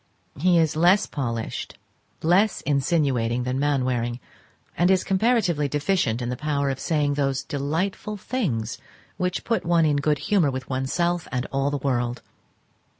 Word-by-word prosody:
He 180 +2 +4
is 160 -1 +2
less 180 +6 +4
polished, 115 -5 -4 0.5
less 190 +6 +3
insinuating 135 -5 +1
than 125 +1 -2
Mainwaring, 125 -4 0 0.6
and 175 +1 +3
is 190 -1 +3
comparatively 190 -7 +2
deficient 145 - 0
in 120 - -3
the 125 - -2
power 140 -1 -1
of 135 - -5
saying 150 -3 +1
those 135 -2 0
delightful 165 +8 -2
things 145 - -2 0.4
which 180 -1 -1
put 230 - 0
one 170 -1 +3
in 150 -2 +2
good 150 +1 +1
humour 185 -3 +2
with 130 -1 -5
oneself 170 +7 -1
and 125 -1 -1
all 135 +1 +1
the 145 - -1
world. 125 -3 -1
145 Hz, 150 wpm, -24 LUFS, 130-175 Hz, 0.6 s, He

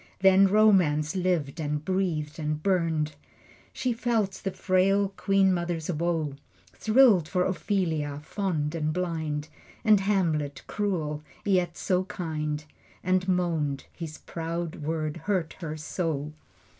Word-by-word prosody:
Then 190 0 +7
Romance 185 -7 +4
lived 175 -5 0
and 150 -1 -2
breathed 165 -5 -1
and 155 0 -2
burned. 165 -5 +1 0.6
She 250 -2 -1
felt 230 -4 0
the 195 - 0
frail 195 +1 +2
queen 195 -1 +2
mother's 170 -1 -2
woe, 165 -3 -1 0.4
Thrilled 220 - +5
for 180 +2 +1
Ophelia, 165 -7 -1
fond 160 -4 -2
and 155 -2 -1
blind, 160 -4 -2 0.4
And 215 -2 +6
Hamlet, 165 -8 0
cruel, 165 -8 -2 0.2
yet 180 -4 +1
so 185 -1 +1
kind, 155 -5 -3 0.4
And 185 0 +1
moaned, 165 -6 0
his 160 -3 -7
proud 165 0 -4
words 155 +1 -3
hurt 180 -2 -1
her 155 -3 -5
so. 150 -2 -3
170 Hz, 120 wpm, -27 LUFS, 155-190 Hz, 0.6 s, Then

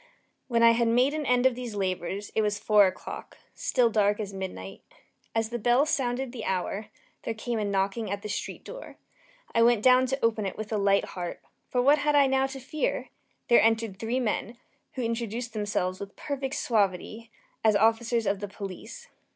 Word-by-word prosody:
When 235 -2 +2
I 230 - +8
had 230 0 +2
made 250 +5 +3
an 305 -2 -3
end 250 0 +3
of 260 - +5
these 240 -3 -6
labors, 190 +1 -3
it 220 - +2
was 210 -1 0
four 205 -1 +5
o'clock 185 - -7 0.2
still 245 -3 +1
dark 205 -1 +2
as 205 -2 -4
midnight. 190 0 -6 0.5
As 225 -1 +1
the 240 0 -3
bell 245 +6 +3
sounded 260 -3 -1
the 235 -3 -7
hour, 195 +3 -2 0.3
there 225 - -4
came 230 +1 -3
a - - 0
knocking 200 +2 -1
at 200 +1 -4
the - - -4
street 210 - -5
door. - - -10 0.6
I 230 - +3
went 230 -2 +4
down 255 0 +6
to 270 +1 -1
open 220 -3 +1
it - - -6
with 215 0 -5
a - - +1
light 200 0 +3
heart, 175 -2 -6 0.3
for 250 -1 +1
what 290 +3 +5
had 295 0 +2
I 285 -1 +6
now 265 0 +2
to 270 0 -8
fear? 275 +4 -2 0.4
There 235 - +6
entered 225 -3 +1
three 230 +3 -1
men, 230 -1 -2 0.4
who 255 - -3
introduced 230 0 -3
themselves, 205 -3 -1
with 200 0 -8
perfect 275 -1 -4
suavity, 215 +1 -1 0.3
as 220 -2 +4
officers 225 +2 +2
of 195 0 0
the 205 - -4
police. 200 - -8
225 Hz, 195 wpm, -27 LUFS, 205-250 Hz, 0.6 s, I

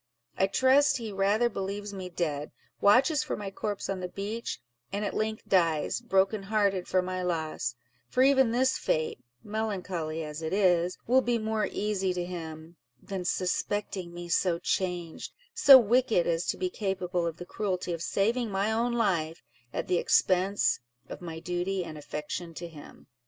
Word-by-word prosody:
I 190 - +2
trust 270 +7 +4
he 225 -3 -5
rather 200 +4 +2
believes 200 -1 -4
me 185 -2 -6
dead, 150 -4 -2 0.3
watches 265 +9 +5
for 300 - -3
my 200 -2 -5
corpse 205 +1 -3
on 195 -1 -2
the 180 - -3
beach, 205 +5 -4 0.3
and 205 +1 -2
at 200 - -2
length 215 0 -2
dies, 165 +1 +2
broken 195 -2 +2
hearted 195 -2 +1
for 185 -1 +2
my 185 0 -3
loss; 160 -8 -2 0.3
for 255 - +3
even 265 -2 +5
this 255 +3 +2
fate 155 -4 -1 0.2
(melancholy 185 -7 -3
as 150 +1 -6
it 160 +2 -3
is) 180 -3 +3
will 255 +3 +4
be 240 -2 +1
more 220 -1 -1
easy 195 -3 -1
to 175 -1 -2
him, 165 -1 -7 0.2
than 190 +4 -5
suspecting 185 0 -1
me 175 0 -7
so 170 0 +2
changed—so 185 - +3
wicked 235 -4 +3
as 165 0 0
to - - 0
be 370 -1 -2
capable 185 - -1
of 165 -1 -4
the 175 - -8
cruelty 185 -3 -2
of 165 - -5
saving 225 +6 0
my 200 +2 0
own 235 +2 +1
life, 175 -9 0 0.3
at - - -3
the 180 - +2
expense 190 +2 +2 0.3
of - - -8
my 165 -2 -6
duty 180 +2 -2
and 155 - -8
affection 150 +3 -5
to 170 - -6
him." 155 -3 -13
190 Hz, 170 wpm, -29 LUFS, 175-215 Hz, 0.3 s, watches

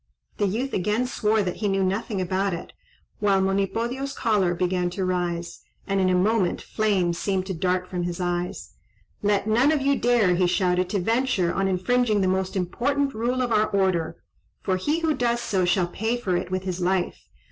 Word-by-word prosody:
The 205 - +1
youth 240 +8 -2
again 210 +6 0
swore 220 -4 +1
that 180 -2 -3
he 210 - -1
knew 195 -1 +1
nothing 195 +2 -1
about 185 +1 0
it, 170 - -9 0.5
while 200 -2 +3
Monipodio's 230 +8 -1
choler 205 -7 +1
began 180 0 0
to 185 +1 -3
rise, 175 -2 -2 0.3
and 195 0 0
in 185 - +3
a 185 - +3
moment 195 0 +2
flames 190 -6 0
seemed 190 -2 -1
to 190 - -3
dart 180 +1 -1
from 180 -1 -3
his 175 0 -3
eyes. 175 0 -3 0.5
"Let 205 -1 +1
none 240 +7 +3
of 310 - +2
you 280 0 +3
dare," 235 -7 +3
he 180 0 +2
shouted, 180 0 +1
"to 205 - 0
venture 225 -3 +1
on 195 0 0
infringing 210 +3 +1
the 190 - +2
most 190 +1 -1
important 275 +10 0
rule 245 +3 0
of 245 - -2
our 215 -1 +3
order, 175 -4 0 0.5
for 185 -1 +1
he 300 - -1
who 320 -1 +2
does 240 -3 0
so 190 -6 0
shall 180 0 +2
pay 220 +7 -2
for 190 -7 -1
it 175 - -2
with 185 0 -2
his 185 -1 -4
life. 185 0 -1
195 Hz, 195 wpm, -24 LUFS, 180-225 Hz, 0.5 s, while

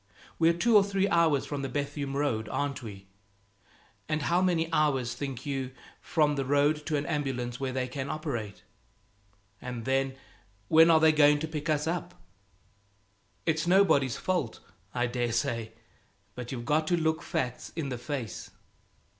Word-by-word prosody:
We're 165 +1 +5
two 235 +5 +3
or 205 - +8
three 195 -1 0
hours 165 -6 +3
from 145 -2 -4
the 135 - -3
Bethune 145 -1 -3
road, 130 -7 -1
aren't 145 -2 -2
we? 100 -4 -9 1.0
And 155 -1 0
how 175 +4 +2
many 170 -3 +2
hours, 135 -6 +2
think 135 0 -5
you, 135 -2 -3 0.3
from 150 -2 +2
the 135 - 0
road 145 +2 +2
to 155 -2 +1
an 145 - -2
ambulance 130 -6 -2
where 135 -1 -2
they 130 0 -2
can 135 +2 -5
operate? 120 - -4 1.0
And 125 -2 -6
then, 135 0 0 0.5
when 160 +1 +7
are 160 -1 +6
they 160 0 +6
going 150 -1 +5
to 160 - -2
pick 155 0 -4
us 150 -1 +1
up? 165 +1 -3 1.3
It's 160 +1 0
nobody's 175 -9 +4
fault, 175 -12 -2 0.3
I 120 +1 0
dare 120 -1 -1
say; 115 0 -1 0.6
but 125 0 -7
you've 120 -3 -5
got 155 +3 +1
to 175 - +2
look 160 -1 0
facts 125 -1 -3
in 155 -4 -3
the 125 - -3
face. 120 -3 -5
145 Hz, 165 wpm, -29 LUFS, 125-160 Hz, 1.3 s, or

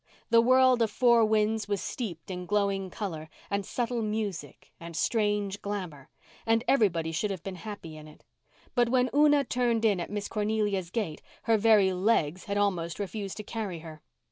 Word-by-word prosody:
The 230 0 +7
world 255 0 +5
of 225 - +3
Four 235 +1 +4
Winds 215 0 +1
was 205 -1 -1
steeped 190 -8 -5
in 180 -1 -6
glowing 200 -1 0
colour, 165 -6 -5 0.2
and 200 0 0
subtle 240 +3 -2
music, 210 - -4
and 170 0 -9
strange 205 -3 0
glamour, 180 -9 -5 0.3
and 225 0 +2
everybody 170 -10 +2
should 185 +6 -1
have 190 -4 -5
been 190 -2 -6
happy 190 -5 -8
in 155 0 -11
it. 150 - -17 0.5
But 240 -2 +2
when 255 0 +2
Una 295 0 +5
turned 240 -3 0
in 205 -4 +3
at 170 - -4
Miss 205 -1 -3
Cornelia's 210 -4 -1
gate 180 -6 -3 0.2
her 225 -1 +3
very 210 -3 +4
legs 185 -3 +1
had 200 -1 -2
almost 180 -5 0
refused 200 0 -5
to 215 - -5
carry 210 -5 -4
her. 155 -1 -10
205 Hz, 175 wpm, -28 LUFS, 180-225 Hz, 0.5 s, The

